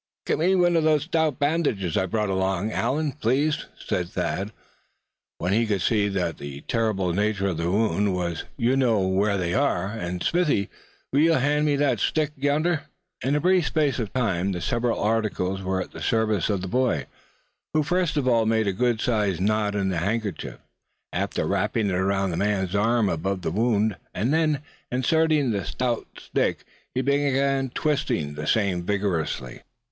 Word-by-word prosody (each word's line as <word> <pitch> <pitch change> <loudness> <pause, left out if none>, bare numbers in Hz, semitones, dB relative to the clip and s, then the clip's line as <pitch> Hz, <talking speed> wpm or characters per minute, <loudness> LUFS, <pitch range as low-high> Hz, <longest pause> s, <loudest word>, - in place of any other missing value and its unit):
"Get - - 0
me 185 +4 +3
one 175 -1 +3
of 165 - +3
those 155 -2 +3
stout 160 -3 0
bandages 145 - 0
I 95 - +1
brought 105 +1 -1
along, 95 +2 0
Allan, 150 +5 0
please," 145 +3 0
said 90 -1 -2
Thad, 100 +3 -2 0.9
when 90 +3 -1
he 115 +2 +2
could 100 -4 0
see 105 -3 +2
what 90 -5 -2
the 70 0 -7
terrible 105 -5 0
nature 100 0 0
of 85 - -3
the 85 +1 -1
wound 105 -1 +1
was; 85 -3 -2
"you 120 +3 +2
know 120 -6 +3
where 100 +2 +1
they 90 -2 -1
are. 110 -8 +1
And 90 -5 -4
Smithy, 160 - +1 0.4
will 140 - +4
you 165 +2 +5
hand 150 +1 +2
me 145 - +3
that 145 -1 +1
stick 155 -2 +1
yonder?" 145 +4 0 0.4
In 135 +4 +1
a - - +2
brief 180 0 +3
space 145 -6 +1
of 110 -4 -3
time 100 -6 0
the 90 - -3
several 120 +8 0
articles 105 -3 0
were 95 0 -1
at - - -15
the - - -9
service 110 -4 +1
of 100 -3 0
the - - -3
boy, 120 - +1 0.7
who 155 - +4
first 175 -1 0
of 135 -3 +1
all 115 -3 +3
made 110 -1 +2
a 100 - 0
good 120 +2 +1
sized 105 -7 0
knot 105 0 +1
in 100 -1 0
the 90 - -1
handkerchief, 100 -1 -3 0.6
after - - -1
wrapping 110 -3 0
it 90 - 0
around 95 +1 +1
the 85 - -3
man's 95 -2 0
arm 110 +2 +2
above 95 +2 -2
the - - -1
wound; 110 +1 +1 0.2
and 115 +10 0
then, 155 -3 +1 0.3
inserting 150 +1 +2
the 100 -3 -1
stout 120 +2 -2
stick, - - -1 0.3
he 130 - +2
began 140 -1 +1
twisting 125 - -1
the 75 +1 -5
same 100 -5 +1
vigorously. 85 -10 -2
110 Hz, 180 wpm, -25 LUFS, 95-140 Hz, 0.9 s, you